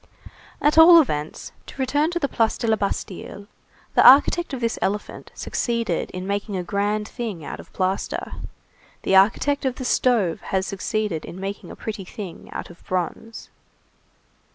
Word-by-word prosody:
At 300 +2 +4
all 335 +1 +10
events, 150 - -2 0.2
to - - -12
return 290 +4 +1
to 350 - -2
the 300 -5 0
Place 225 -3 +1
de - - -3
la 220 - +4
Bastille, 200 -1 -4 0.5
the - - +5
architect 300 +6 +6
of 265 - -4
this 230 -1 -1
elephant 205 +2 -3
succeeded 230 -7 -2
in 185 0 -6
making 200 +1 -2
a 180 - -2
grand 205 +3 -1
thing 215 - -6
out - - -6
of - - -13
plaster; 190 +1 -2 0.7
the 195 - +2
architect 220 +9 +3
of 260 -2 -1
the 260 - -6
stove 235 -9 +2
has 190 -1 -1
succeeded 200 -3 -2
in 180 - -9
making 195 +1 -6
a - - -9
pretty 210 -3 -6
thing 185 -1 -9
out - - -6
of 175 - -18
bronze. 185 +5 -4
210 Hz, 165 wpm, -23 LUFS, 190-255 Hz, 0.7 s, all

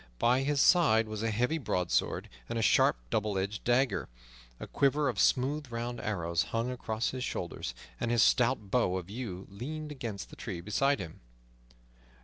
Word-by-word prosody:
By 125 - +3
his 145 +1 0
side 135 -11 +5
was 110 -1 -5
a 115 - 0
heavy 125 +9 0
broadsword 90 - 0 0.2
and - - -2
a 115 - 0
sharp, 95 - +4
double 105 -2 0
edged 100 +2 -2
dagger. 120 -3 +1 0.5
A - - -5
quiver 140 +1 +2
of 120 -6 -1
smooth 140 +1 +2
round 120 +1 -4
arrows 85 -5 -1
hung 115 +2 -2
across 115 -2 -2
his 130 -1 -4
shoulders, - - -4 0.2
and 120 - -1
his 120 -2 +4
stout 120 -5 +2
bow 100 -7 +2
of 90 +1 -7
yew 105 -6 -5
leaned 150 +9 -6
against 115 -8 -6
the - - -10
tree 95 -7 -5
beside 135 +10 +1
him. 80 -4 -8
115 Hz, 170 wpm, -31 LUFS, 100-130 Hz, 0.5 s, side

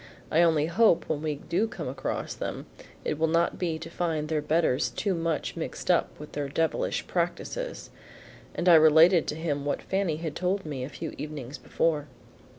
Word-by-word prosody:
I 160 - +4
only 160 -3 +4
hope, 170 +2 +3
when 150 -2 -1
we 155 -1 -1
do 180 +9 -1
come 170 -9 -6
across 135 +1 -3
them, - - -5 0.4
it 150 - -1
will 160 - +3
not 170 +1 +1
be 170 -3 -1
to 165 - -8
find 165 -3 -2
their 155 -2 0
betters 150 -3 +1
too 200 -2 -1
much 165 -2 -2
mixed 165 +2 -2
up 175 - +1
with 150 - -9
their 145 -1 -3
devilish 160 +3 0
practices." 175 - -3 0.6
And 175 - -2
I 175 - +8
related 160 +2 +7
to - - -2
him 150 -3 -2
what 145 - -2
Fanny 190 -5 0
had 160 -2 -5
told 185 +1 -1
me 140 -4 -4
a 130 - -5
few 160 +1 -6
evenings 145 -3 -6
before. 155 -3 0
160 Hz, 185 wpm, -27 LUFS, 150-170 Hz, 0.6 s, I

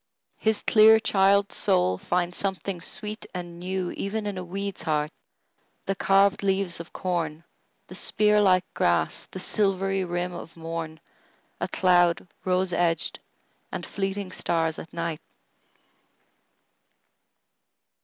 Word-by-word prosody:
His 220 -1 +1
clear 220 0 +7
child's 200 -2 +3
soul 90 +1 +2
finds 175 0 -1
something 195 -2 -2
sweet 210 +4 -4
and 175 -1 -6
newEven 190 +3 -3
in 205 -1 -3
a 185 - -4
weed's 195 +2 -5
heart, 150 -1 0 0.7
the 195 - 0
carved 195 +1 +3
leaves 195 -3 0
of 170 - -9
corn, 165 -3 -2 0.4
The - - -12
spear 210 0 +2
like 185 -2 +4
grass, 85 -2 +1
the - - -9
silvery 195 0 0
rim 175 0 -2
of 170 -1 -9
morn,A 165 -1 -8
cloud 175 -1 +3 0.2
rose 185 -1 +1
edged, 170 -2 0 0.5
and - - -4
fleeting 195 -1 -3
stars 165 -3 0
at 165 - -10
night! 170 -2 -3
185 Hz, 115 wpm, -26 LUFS, 170-195 Hz, 0.7 s, clear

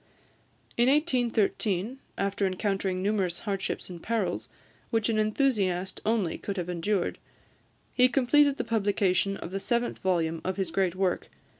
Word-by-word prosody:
In 240 +2 +4
1813, 240 - +1 0.2
after 200 0 0
encountering 190 -1 -1
numerous 195 -4 0
hardships 195 -3 -3
and 175 -2 -9
perils, 230 0 -1 0.4
which 225 -1 +1
an 220 -1 +2
enthusiast 210 -5 +1
only 215 -7 +1
could 200 -1 -4
have 180 -1 -3
endured, 180 +2 -1 0.7
he 250 0 +5
completed 280 +2 +4
the - - -1
publication 200 -3 +1
of 170 - -7
the 195 - -2
seventh 235 +3 -1
volume 165 -3 0
of 185 +1 -2
his 190 -4 -1
great 185 -1 +1
work. 185 -1 0
200 Hz, 140 wpm, -28 LUFS, 185-230 Hz, 0.7 s, he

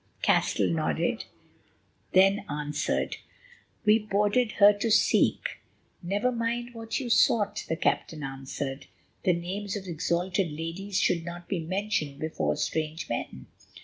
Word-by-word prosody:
Castell 95 - +3
nodded, 80 -3 0 0.9
then 195 +2 +5
answered: 150 0 -1 0.7
"We 215 +1 +6
boarded 210 +3 +1
her 205 0 +7
to 230 - 0
seek——" 220 - +3 0.4
"Never 200 +8 0
mind 240 0 -2
what 225 -1 -3
you 260 - -4
sought," 210 -3 +3
the 165 - +1
captain 155 -1 -1
answered; 135 0 -5 0.4
"the 180 - +5
names 190 +4 -4
of 200 -2 -5
exalted 175 +2 0
ladies 165 +6 -3
should 170 -2 +2
not 175 +1 -8
be 190 - -1
mentioned 185 -4 -2
before 160 0 -1
strange 160 +1 -2
men. 65 - -4
185 Hz, 125 wpm, -28 LUFS, 155-210 Hz, 0.9 s, her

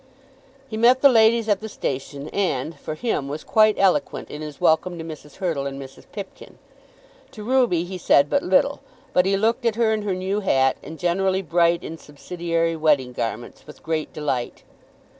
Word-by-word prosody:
He 220 -4 -6
met 245 +3 +4
the 280 - +9
ladies 225 -1 +4
at 205 -3 +2
the 220 - -6
station 140 -4 -5
and, 160 -6 -1
for 155 - -5
him, 155 - -2
was 150 +2 -5
quite 215 -1 +4
eloquent 195 -2 +1
in 150 - -7
his 150 -2 -8
welcome 175 +2 +2
to 165 - -6
Mrs. 155 -2 -10
Hurtle 165 -8 -2
and 135 0 -6
Mrs. 135 -1 -11
Pipkin. 200 -2 -9 0.7
To 215 -5 -10
Ruby 240 -8 +2
he 180 +1 -7
said 140 -4 +4
but - - +1
little. 235 +10 +2 0.3
But 180 +1 +3
he 195 0 +2
looked 230 +5 +1
at 230 -2 +1
her 225 -1 +2
in 215 - -1
her 200 -3 -2
new 190 +3 -2
hat, 135 -9 +2
and 160 - -9
generally 190 +2 0
bright 170 0 +2
in 165 0 -7
subsidiary 165 +2 -3
wedding 145 -5 +1
garments, 120 +4 -5
with 150 - -14
great 160 -1 -2
delight. 135 -5 -3
175 Hz, 185 wpm, -23 LUFS, 150-210 Hz, 0.7 s, the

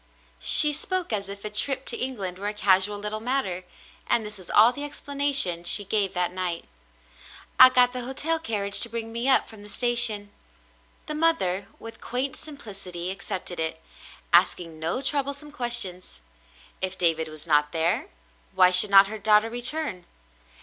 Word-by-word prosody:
She 300 -1 +8
spoke 360 - -3
as 200 -2 -3
if 200 +1 -10
a - - -2
trip 265 +5 0
to - - -4
England 200 -8 -4
were 205 - -5
a 210 - -4
casual 200 0 +1
little 210 +1 -5
matter, 220 -7 -3 0.4
and 225 - +2
this 210 -1 -8
was 180 - -10
all 220 +3 +5
the 285 - -8
explana 285 0 -3
tion 175 -9 +4
she 205 +4 +2
gave 200 -1 -1
that 180 0 -1
night. 180 -2 -4 0.9
"I 255 - +10
got 250 -1 +3
the 250 - -4
hotel 290 +6 -2
carriage 205 -9 -2
to 235 - +4
bring 225 0 -6
me 235 +3 -2
up 265 - +4
from 220 -2 -13
the 205 - -13
station." 230 -4 +1 0.7
The 305 - -4
mother, 300 - 0
with 225 0 -12
quaint 255 +3 -3
simplicity, 195 - -8
accepted 185 -2 -7
it, 160 0 -4 0.5
asking 170 -2 +1
no 165 +12 -3
troublesome 280 +1 -2
questions. 235 - -2 0.6
If 190 0 -4
David 165 -2 0
was 155 0 -12
not 150 -2 +1
there, 175 - -1 0.5
why 185 -1 +4
should 185 +3 +6
not 195 0 +7
her 215 +1 -8
daughter 215 +2 +2
return. 245 - -3
210 Hz, 170 wpm, -24 LUFS, 185-255 Hz, 0.9 s, I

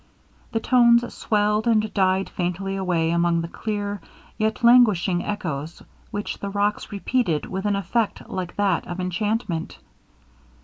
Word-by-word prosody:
The 225 - 0
tones 235 0 +4
swelled 210 +1 +1
and 215 -2 +2
died 190 -1 +2
faintly 185 +2 -3
away 175 -4 0
among 170 0 +2
the 165 - -4
clear, 205 +1 -4 0.3
yet 220 +3 -1
languishing 210 -7 +5
echoes 165 -6 -4 0.3
which 205 0 -4
the 200 - -4
rocks 205 +2 -1
repeated 200 -5 0
with 190 +1 -5
an 205 - +1
effect 215 +2 -1
like 180 -2 -5
that 200 -4 0
of 175 +1 -5
enchantment. 185 -1 -2
200 Hz, 135 wpm, -23 LUFS, 175-215 Hz, 0.3 s, languishing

